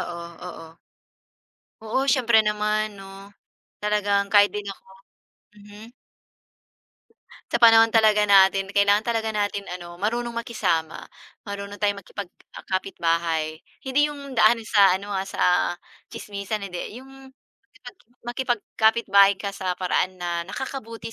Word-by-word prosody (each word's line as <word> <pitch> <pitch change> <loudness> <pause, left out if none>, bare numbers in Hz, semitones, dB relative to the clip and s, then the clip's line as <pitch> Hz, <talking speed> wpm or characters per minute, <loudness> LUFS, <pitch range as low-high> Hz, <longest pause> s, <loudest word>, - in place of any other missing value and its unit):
Oo, 170 -1 -6 0.2
oo. 165 -1 -12 1.1
Oo. 260 +5 -1
Siyempre 240 -5 +3
naman 210 0 -1
'no. 195 +1 -13 0.5
Talagang 205 -1 0
kahit 205 -1 +5
din 210 -1 -5
ako. 195 -1 -10 0.7
Mm. 205 +2 -13 1.7
Sa - - +1
panahon 225 -1 +7
talaga 215 -2 +4
natin 195 0 +4
kailangan 200 +1 +3
talaga 225 -2 -1
natin 205 -2 -2
ano, 175 0 -12
marunong 235 +3 -2
makisama, 195 -9 -2 0.4
marunong 200 0 -7
tayong 205 -1 -1
makipag-kapitbahay, 170 -4 -3 0.2
hindi 285 +3 +2
yung 280 -2 -9
daan 230 -1 +3
sa 200 -4 +4
ano, 200 +2 -8
ah, 195 0 -3
sa 180 0 +1 0.3
tsismisan, 200 0 -5
hindi, 180 -2 -6 0.2
yung, 270 +1 -13 1.0
makipag 240 0 -2
makipag-kapitbahay 200 -3 +3
ka 200 0 -5
sa 185 -2 -3
paraan 185 0 -1
na 175 -1 -3
nakakabuti 230 -2 -7
205 Hz, 115 wpm, -23 LUFS, 195-225 Hz, 1.7 s, panahon